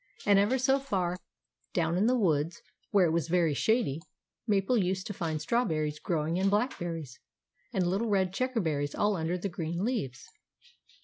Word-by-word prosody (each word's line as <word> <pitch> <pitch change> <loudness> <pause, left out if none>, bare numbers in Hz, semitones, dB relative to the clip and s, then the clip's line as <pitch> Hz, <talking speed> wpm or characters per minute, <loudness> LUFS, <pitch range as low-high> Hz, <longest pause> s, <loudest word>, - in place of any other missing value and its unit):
And 200 -1 +5
ever 210 +6 +3
so 265 +2 +3
far 190 -10 -1 0.6
down 165 -1 +1
in 200 +5 +3
the 255 +1 +3
woods, 165 -5 0 0.3
where 195 -3 +4
it 165 - +2
was 165 -1 0
very 170 -3 +2
shady, 165 - +1 0.5
Mabel 200 +3 +2
used 185 -3 0
to 205 - -4
find 165 -5 -2
strawberries 155 -6 0
growing, 165 +1 -1
and 195 +1 +3
blackberries, 175 - -2 0.5
and 185 - +1
little 195 +6 0
red 190 -2 +1
checkerberries 175 - -1
all 205 0 +2
under 165 +1 -1
the 180 - -3
green 170 +1 -3
leaves. 140 - -3
180 Hz, 165 wpm, -30 LUFS, 160-205 Hz, 0.6 s, And